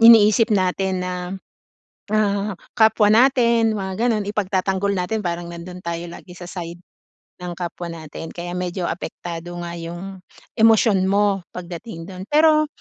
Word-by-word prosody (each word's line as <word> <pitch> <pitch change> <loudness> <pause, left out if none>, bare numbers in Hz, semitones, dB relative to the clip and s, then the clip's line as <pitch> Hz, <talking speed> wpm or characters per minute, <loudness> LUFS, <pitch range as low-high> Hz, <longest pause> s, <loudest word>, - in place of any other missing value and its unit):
iniisip 225 0 +8
natin 190 -1 +1
na, 180 - -2 1.0
ah, 205 -1 +1 0.2
kapwa 220 -1 +5
natin 235 -2 +4
mga 190 -1 -3 0.2
gano'n 215 -3 0
ipagtatanggol 195 -1 0
natin 210 +4 -1
parang 175 -1 -3
nando'n 170 +1 -8
tayo 170 0 -3
lagi 175 +1 -11
sa 175 0 -9
side 175 -1 -7 0.6
ng 180 -1 -5
kapwa 175 0 -5
natin. 160 0 -8
Kaya 175 0 -5
medyo 180 +1 -3
apektado 175 0 -6
nga 170 - -5
yung 175 +3 -7 0.4
emosyon 220 -3 +5
mo 200 -1 +2
pagdating 175 0 -7
do'n. 185 -1 -7
Pero 310 +3 +5
190 Hz, 135 wpm, -22 LUFS, 175-215 Hz, 1.0 s, iniisip